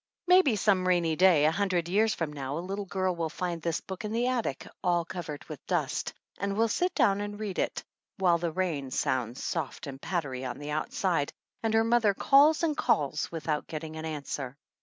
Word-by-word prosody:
Maybe 360 -9 +5
some 190 -2 +2
rainy 170 -3 +2
day, 175 -4 +5
a 155 - +5
hundred 180 -2 0
years 215 +5 +2
from 160 -3 -3
now, 140 0 -4
a - - -2
little 195 +1 -4
girl 185 -1 0
will 165 -1 -2
find 170 +1 -3
this 165 -1 -1
book 190 +1 -7
in 210 - -3
the 235 +2 +1
attic, 245 - -1 0.2
all 175 -2 +2
covered 160 -5 -6
with - - -9
dust, - - -1 0.3
and 200 0 -2
will 225 +1 +4
sit 360 - 0
down 200 0 +3
and 205 0 -5
read 205 -3 -3
it, - - -1 0.3
while 175 -3 +3
the 170 0 -1
rain 160 -6 -2
sounds 125 -1 -1
soft - - -3
and 135 -1 -8
pattery 155 -7 -2
on 125 - -4
the 145 +1 -6
outside, 155 0 0 0.3
and 225 -1 +1
her 225 - +5
mother 225 -3 +3
calls 295 - +5
and 310 -3 +2
calls 150 - +1
without 155 -2 -2
getting 155 0 -6
an 160 0 -5
answer. 140 -4 -4
175 Hz, 200 wpm, -29 LUFS, 155-205 Hz, 0.3 s, Maybe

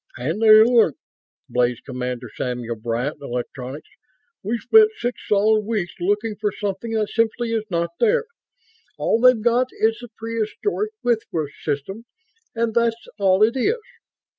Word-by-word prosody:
"And 155 - -3
they 225 - +4
aren't!" 225 - +4 0.5
blazed 125 -1 0
Commander 125 -1 -4
Samuel 120 -2 -3
Bryant 120 +6 -3
(Electronics). 130 +2 -6 0.5
"We've 225 +4 -2
spent 435 - +6
six 245 -6 -3
solid 215 +1 +3
weeks 205 -5 -2
looking 205 +4 -1
for 210 -1 +1
something 205 +4 -4
that 215 -2 0
simply 230 +1 0
is 220 -1 -1
not 170 -1 -1
there. 470 0 +3 0.7
All 225 - +1
they've 255 -2 +6
got 240 +3 +2
is 225 +1 0
the 240 - -8
prehistoric 230 - -2
Whitworth 170 -11 -1
system 160 - -4 0.5
and 230 -1 0
that's 235 0 0
all 195 0 +4
it 225 +3 +3
is. 415 - +1
215 Hz, 140 wpm, -22 LUFS, 150-230 Hz, 0.7 s, spent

